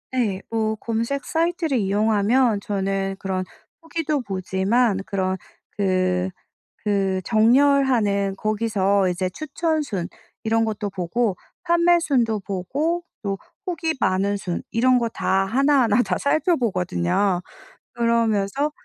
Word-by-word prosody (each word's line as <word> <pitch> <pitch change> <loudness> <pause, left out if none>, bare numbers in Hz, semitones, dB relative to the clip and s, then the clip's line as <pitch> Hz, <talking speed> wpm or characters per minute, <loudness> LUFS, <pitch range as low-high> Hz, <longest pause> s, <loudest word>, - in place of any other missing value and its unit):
네. 220 -7 -1
뭐 220 -1 0
검색 230 +5 -2
사이트를 330 -3 0
이용하면 215 +3 +2
저는 195 -1 -2
그런 185 -1 -2 0.4
후기도 325 -3 -2
보지만 195 +2 0
그런 190 -1 -1 0.4
그 185 -2 +1 0.6
그 195 -2 +1
정렬하는 230 -4 +3
거기서 200 -2 +1
이제 180 +1 -1
추천순 300 - -2 0.3
이런 225 0 +2
것도 210 -2 -3
보고, 190 +3 -1 0.3
판매순도 335 - +2
보고 280 - -2 0.2
또 200 -2 -2 0.3
후기 335 -3 -2
많은 195 +2 +1
순 180 -3 -4
이런 250 +2 +4
거 235 -1 0
다 195 -3 0
하나하나 250 -1 +3
다 185 -4 -1
살펴보거든요. 195 - +1 0.5
그러면서 230 +3 +1
215 Hz, 240 characters per minute, -23 LUFS, 195-265 Hz, 0.6 s, 이런